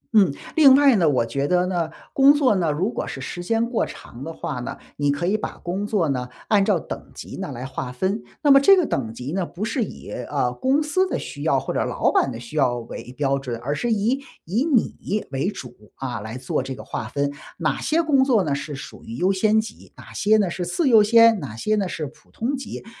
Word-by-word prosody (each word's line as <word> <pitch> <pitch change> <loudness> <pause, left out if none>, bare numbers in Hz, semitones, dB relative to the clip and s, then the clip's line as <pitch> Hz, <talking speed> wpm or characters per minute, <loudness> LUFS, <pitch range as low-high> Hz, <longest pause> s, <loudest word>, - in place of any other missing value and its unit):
嗯， 195 -9 +6 0.2
另 280 -4 +8
外 280 -2 +6
呢， 170 -6 +3
我 125 -4 +2
觉 140 +5 -2
得 180 0 +2
呢， 175 -3 -1 0.2
工 275 +1 +7
作 270 -7 +3
呢， 170 -5 +1
如 185 +10 -1
果 - - -4
是 - - -6
时 175 +7 -6
间 225 +4 +1
过 240 - 0
长 120 +3 -8
的 165 - -5
话 155 -6 -5
呢， 120 - -5 0.2
你 145 -1 0
可 145 +4 0
以 195 +4 +2
把 215 - -4
工 190 +4 -3
作 195 -7 +1
呢 125 -2 -2 0.2
按 205 -2 +4
照 195 -4 +2
等 - - -8
级 - - -8
呢 - - -5
来 125 +2 -6
划 130 -1 -5
分。 190 - -2 0.2
那 290 - +6
么 275 - +9
这 390 +7 +7
个 355 - +3
等 115 -5 -2
级 125 +5 -6
呢， 190 -1 0
不 180 +4 -5
是 235 +2 0
以 - - -8
呃， 125 0 -2
公 270 - +1
司 370 +6 +1
的 300 - -2
需 145 - -7
要 140 -3 +2
或 - - -4
者 - - +1
老 - - +1
板 - - +2
的 115 - -7
需 120 +6 -10
要 130 -4 +3
为 120 +1 -8
标 140 -1 +1
准， 120 -4 -5
而 140 +4 -1
是 235 +10 -1
以 225 +6 +1 0.2
以 210 - 0
你 225 -7 0
为 135 +9 0
主 125 -11 -8 0.2
啊 125 -3 -4
来 110 +4 -6
做 130 0 -2
这 130 0 -5
个 - - -10
划 130 -6 -5
分。 140 +4 -1 0.3
哪 - - -1
些 330 +2 +1
工 275 -4 +4
作 235 -8 +3
呢 145 -3 -1
是 145 +1 -4
属 135 - -10
于 115 - -8
优 185 +9 +2
先 215 +3 +3
级、 220 - -7
哪 - - -13
些 215 +1 +3
呢 200 -3 +2
是 180 - -3
次 270 - 0
优 225 -4 +7
先、 230 0 +6
哪 135 -9 -7
些 215 - -1
呢 200 -3 -1
是 155 - -4
普 150 +2 -14
通 255 +5 -2
级。 270 - -7
180 Hz, 265 characters per minute, -23 LUFS, 135-225 Hz, 0.3 s, 么